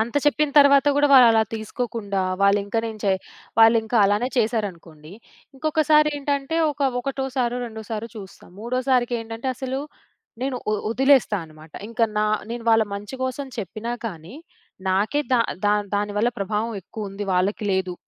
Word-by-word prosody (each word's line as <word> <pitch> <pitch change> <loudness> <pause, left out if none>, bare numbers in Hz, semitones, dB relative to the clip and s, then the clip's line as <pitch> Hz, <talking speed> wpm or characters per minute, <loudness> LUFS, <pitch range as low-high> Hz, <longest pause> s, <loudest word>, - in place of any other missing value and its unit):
అంత 230 +4 -2
చెప్పిన 295 0 +2
తరువాత 280 0 +6
కూడా 290 0 +4
వాళ్ళు 255 -2 +9
అలా 225 -1 +4
తీసుకోకుండా, 220 -2 -3 0.2
వాళ్ళు 200 +1 +5
ఇంకా 205 +3 -2
నేను 220 -1 -7
చె 195 - +3 0.5
వాళ్ళు 225 +1 +7
ఇంకా 230 +2 -1
అలానే 205 +5 +1
చేసారనుకోండి, 185 -9 -3 0.4
ఇంకొకసారి 305 +1 +3
ఏంటంటే 285 +2 -2
ఒక 290 0 -10 0.2
ఒకటోసారో, 260 -2 -2
రెండోసారో 220 0 -6
చూస్తాం. 195 -3 -12
మూడోసారికి 250 +1 0
ఏంటంటే, 225 +3 -5
అసలు 265 +1 -3 0.6
నేను 265 -1 -1
వొ - - +2 0.2
వొదిలేస్తా 265 -3 +3
అన్నమాట. 155 0 -16 0.2
ఇంక 230 0 -7 0.2
నా 215 - +2 0.2
నేను 235 0 -5
వాళ్ళ 225 0 +5
మంచి 205 +5 -7
కోసం 265 +2 -4
చెప్పినా 215 +4 -4
కానీ, 175 - -8 0.6
నాకే 210 +10 +1
దా 245 - +4 0.3
దాన్ 205 0 +1
దాని 205 0 -2
వల్ల 230 - +3
ప్రభావం 210 +3 -2
ఎక్కువ 210 +3 -7
ఉంది 200 +1 -5
వాళ్ళకి 190 +4 0
లేదు. 185 -1 -1
225 Hz, 155 wpm, -23 LUFS, 205-260 Hz, 0.6 s, వాళ్ళు